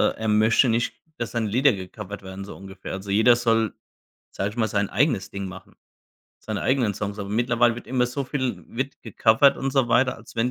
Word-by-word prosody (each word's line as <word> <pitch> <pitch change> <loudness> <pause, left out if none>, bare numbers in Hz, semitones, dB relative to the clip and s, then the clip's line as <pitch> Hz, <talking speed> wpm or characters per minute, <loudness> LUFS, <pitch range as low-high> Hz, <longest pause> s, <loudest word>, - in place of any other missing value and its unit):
er 110 0 -4
möchte 110 +4 +4
nicht, 115 +1 0 0.2
dass 120 - -4
seine 115 -2 -1
Lieder 130 +4 +4
gecovert 100 +1 -7
werden, 95 +1 -8
so - - -9
ungefähr. 95 0 -9
Also, 95 +1 -6
jeder 110 +4 +5
soll, 115 -2 +1 0.6
sage 100 - -2
ich 105 - -11
mal, 110 -2 +2
sein 100 -1 0
eigenes 140 -10 +1
Ding 100 0 -5
machen, 95 0 -11 0.7
seine 110 -2 -4
eigenen 125 -6 +1
Songs, 100 +1 -4
aber 100 - -5
mittlerweile 120 +1 +2
wird 120 - -9
immer 125 -1 +1
so 135 +3 -3
viel 125 - -3
wird 135 +3 -5
gecovert 115 +4 +4
und 135 0 -2
so 135 -3 +3
weiter, 130 +2 +2
als 115 - -15
wenn 115 +2 +1
115 Hz, 205 wpm, -24 LUFS, 100-125 Hz, 0.7 s, jeder